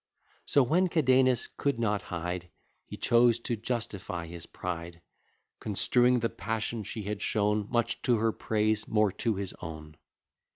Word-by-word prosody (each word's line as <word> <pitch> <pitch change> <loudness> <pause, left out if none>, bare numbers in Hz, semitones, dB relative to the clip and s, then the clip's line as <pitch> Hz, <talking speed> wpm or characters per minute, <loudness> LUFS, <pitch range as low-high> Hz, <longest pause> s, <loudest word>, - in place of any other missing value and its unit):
So 140 - +4
when 175 +9 +3
Cadenus 130 -6 +3
could 140 -3 0
not 105 -3 +1
hide, 90 0 -4 0.4
He - - -8
chose 120 0 +4
to 120 - -1
justify 105 -6 -4
his 85 0 -9
pride; 85 -1 -5 0.6
Construing 120 +5 +3
the 115 - +2
passion 110 0 -3
she 105 +2 -5
had 105 0 -4
shown, 105 -1 +1
Much 120 -1 0
to 120 -3 +2
her 110 +1 +2
praise, 110 0 0
more 105 -2 +3
to 115 -3 +1
his 95 -1 -4
own. 80 -2 -8
110 Hz, 150 wpm, -29 LUFS, 95-120 Hz, 0.6 s, So